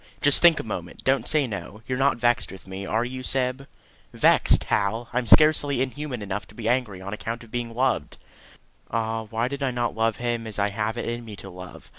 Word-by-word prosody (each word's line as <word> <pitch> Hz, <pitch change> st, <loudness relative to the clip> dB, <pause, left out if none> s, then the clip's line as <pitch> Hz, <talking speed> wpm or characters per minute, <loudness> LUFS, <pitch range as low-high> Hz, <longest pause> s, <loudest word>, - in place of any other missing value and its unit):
Just 145 Hz, -1 st, +6 dB
think 170 Hz, -2 st, +6 dB
a -, -, -3 dB
moment; 90 Hz, -5 st, -6 dB
don't 130 Hz, -3 st, +1 dB
say 155 Hz, -3 st, +3 dB
no. 105 Hz, -1 st, -7 dB
You 130 Hz, -, -2 dB
are -, -, -4 dB
not 135 Hz, -1 st, +3 dB
vexed 120 Hz, 0 st, +1 dB
with 95 Hz, -, -12 dB
me 95 Hz, 0 st, -7 dB
are 115 Hz, +2 st, 0 dB
you, 130 Hz, +1 st, -6 dB
Syb?" 130 Hz, +1 st, -1 dB, 0.4 s
"Vexed, -, -, +4 dB
Hal! 110 Hz, +4 st, 0 dB
I 125 Hz, -, +2 dB
am 120 Hz, -, -5 dB
scarcely 145 Hz, -1 st, +5 dB
inhuman 130 Hz, -2 st, -3 dB
enough 100 Hz, +1 st, -4 dB
to 105 Hz, -, -17 dB
be 110 Hz, -1 st, -4 dB
angry 115 Hz, -6 st, 0 dB
on 100 Hz, +2 st, -6 dB
account 115 Hz, +2 st, -5 dB
of 115 Hz, -, -16 dB
being 120 Hz, -2 st, -4 dB
loved." 130 Hz, +2 st, 0 dB, 0.7 s
Ah, 115 Hz, 0 st, -2 dB
why 115 Hz, +2 st, -1 dB
did 140 Hz, +1 st, -5 dB
I 135 Hz, -, +1 dB
not 120 Hz, -1 st, -2 dB
love 115 Hz, 0 st, +1 dB
him 120 Hz, -1 st, -2 dB
as 110 Hz, -, -7 dB
I 100 Hz, 0 st, +1 dB
have 105 Hz, +3 st, -2 dB
it -, -, -3 dB
in 120 Hz, 0 st, -3 dB
me 110 Hz, -2 st, -9 dB
to 95 Hz, -1 st, -10 dB
love! 90 Hz, 0 st, -11 dB
115 Hz, 230 wpm, -25 LUFS, 105-130 Hz, 0.7 s, Just